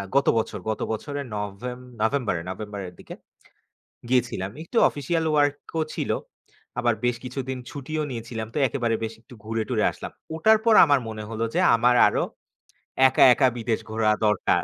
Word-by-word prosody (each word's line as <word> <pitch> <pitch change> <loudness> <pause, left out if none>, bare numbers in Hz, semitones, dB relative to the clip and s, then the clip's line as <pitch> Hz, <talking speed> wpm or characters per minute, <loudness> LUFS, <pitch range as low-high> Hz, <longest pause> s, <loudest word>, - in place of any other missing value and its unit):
গত 140 - +3
বছর, 110 - -2
গত 110 - -2
বছরের 140 +5 -4
নভেম 105 +5 -5 0.2
নভেম্বর 120 -2 +1
নভেম্বরের 100 -1 -6
দিকে - - -10 0.9
গিয়েছিলাম। 120 -6 0
একটু 200 - -5
অফিসিয়াল 160 +4 -2
ওয়ার্ক 145 -1 +3 0.2
ও - - +2
ছিল। - - -1 0.7
আবার 120 -1 +2
বেশ 120 - +2
কিছুদিন 130 0 -4
ছুটিও 155 +2 -4
নিয়েছিলাম, 115 -2 -5
তো - - -4
একেবারে 120 -4 -1
বেশ 110 - -3
একটু 125 - -16
ঘুরে 110 0 -1
টুরে 115 -4 +1
আসলাম। - - -8 0.2
ওটার 220 +7 +5
পর 230 - +5
আমার 145 -3 +4
মনে 110 -1 -6
হল 115 0 -5
যে - - +3 0.2
আমার 120 +2 +3
আরো - - 0 0.9
একা - - +4
একা 135 0 +3
বিদেশ 115 -1 -1
ঘোরা 110 0 +2
দরকার। 105 -2 +2
120 Hz, 160 wpm, -25 LUFS, 110-140 Hz, 0.9 s, ওটার